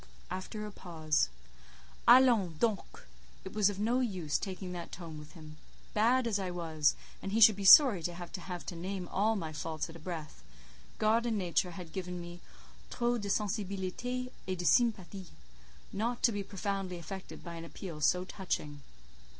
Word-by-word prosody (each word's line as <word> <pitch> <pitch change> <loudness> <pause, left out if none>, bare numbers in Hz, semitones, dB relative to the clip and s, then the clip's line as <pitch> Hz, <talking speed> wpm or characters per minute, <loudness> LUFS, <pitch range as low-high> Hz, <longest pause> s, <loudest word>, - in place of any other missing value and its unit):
(After 185 +3 -5
a 210 - -7
pause:) 160 - 0 0.8
"Allons 235 -9 +6
donc! 215 0 -2 0.4
It 190 - -7
was 210 -2 +4
of 200 -1 -5
no 235 +4 +2
use 185 - -1
taking 185 -1 -5
that 175 -1 -6
tone 165 -3 -8
with 150 +1 -12
him. 155 -3 -12 0.4
Bad 240 +4 +3
as 215 -3 0
I 190 -2 -2
was—and 165 +2 -2
he 225 - +2
should 220 -2 +8
be 200 0 -5
sorry 230 - +9
to 175 +1 -3
have 175 -1 -8 0.3
to 175 - -5
name 185 +1 -4
all 215 +3 +2
my 160 -6 -4
faults 155 +1 -4
at - - -14
a - - -10
breath—God 185 +7 -3
and 225 -2 0
nature 180 -1 0
had 170 -4 -9
given 180 -1 -4
me 175 0 -9 0.5
'trop 240 -1 0
de 200 - -4
sensibilité 210 +5 -2 0.2
et 185 -1 -2
de 175 - -4
sympathie' 195 -5 +2 0.7
not 235 +4 -2
to 235 - +5
be 205 -2 -2
profoundly 195 -2 -3
affected 190 +3 -8
by 170 - -7
an 165 0 -7
appeal 165 -1 -8
so 180 +4 +3
touching." 150 -7 -4
190 Hz, 165 wpm, -32 LUFS, 170-215 Hz, 0.8 s, sorry